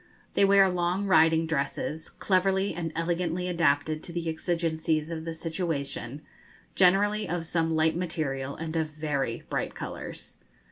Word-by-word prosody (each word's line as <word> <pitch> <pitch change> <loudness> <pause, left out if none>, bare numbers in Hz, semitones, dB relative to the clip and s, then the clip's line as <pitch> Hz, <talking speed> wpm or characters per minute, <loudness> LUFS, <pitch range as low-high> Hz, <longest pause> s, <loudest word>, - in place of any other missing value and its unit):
They - - +3
wear 195 0 +6
long 180 +2 0
riding 165 -3 +5
dresses, 155 +1 -2
cleverly 190 0 +1
and 165 -1 -3
elegantly 175 +1 -1
adapted 155 -3 +1
to - - -8
the 170 -1 -3
exigencies 160 -1 -1
of 160 -1 -5
the 165 - -3
situation, 155 -5 -3 0.5
generally 205 +3 +3
of 170 -1 -2
some 165 0 0
light 160 0 +2
material, 140 -6 -2
and 160 0 -5
of 160 -1 +1
very 150 -6 -2
bright - - -2
colours. - - -7
165 Hz, 140 wpm, -28 LUFS, 155-180 Hz, 0.5 s, wear